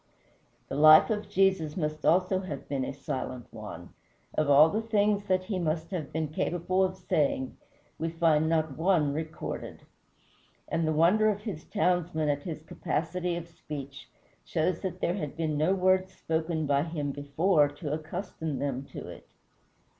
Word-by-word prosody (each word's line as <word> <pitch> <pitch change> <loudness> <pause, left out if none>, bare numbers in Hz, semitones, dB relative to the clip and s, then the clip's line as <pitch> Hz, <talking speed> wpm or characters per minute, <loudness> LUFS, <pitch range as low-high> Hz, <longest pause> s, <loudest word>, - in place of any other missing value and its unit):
The - - -5
life 155 +6 +8
of 210 -1 -2
Jesus 190 -5 +2
must 155 -2 -2
also 180 +4 +3
have 180 -8 -6
been 135 -2 -1
a - - -3
silent 130 -2 -5
one. 105 -5 -8 0.4
Of 155 -2 +1
all 145 +2 +8
the 215 - 0
things 210 -2 +1
that 185 -2 +1
he 185 -1 -3
must 160 0 -2
have 165 -7 -4
been 160 -1 -2
capable 175 +4 0
of 185 0 -1
saying 150 -7 0 0.4
we 165 - -1
find 160 -2 +2
not 160 -3 0
one 165 -5 +3
recorded. 160 +1 -5 0.8
And 165 -1 0
the - - +2
wonder 180 +8 +4
of 205 -1 -2
his 190 -8 -6
townsmen 175 -6 0
at 145 0 0
his 155 -1 -6
capacity 175 +2 -2
of 170 -1 -5
speech 140 -4 -8 0.3
shows 160 - 0
that 190 -2 -4
there 170 - +1
had 150 -4 -5
been 160 -2 -1
no 155 +6 +2
words 185 0 +2
spoken 160 0 -1
by 140 -1 +2
him 150 -3 -3
before 145 +3 +2
to 145 +1 -5
accustom 160 -1 -4
them 135 -1 -2
to - - -7
it. - - -11
160 Hz, 165 wpm, -29 LUFS, 150-185 Hz, 0.8 s, life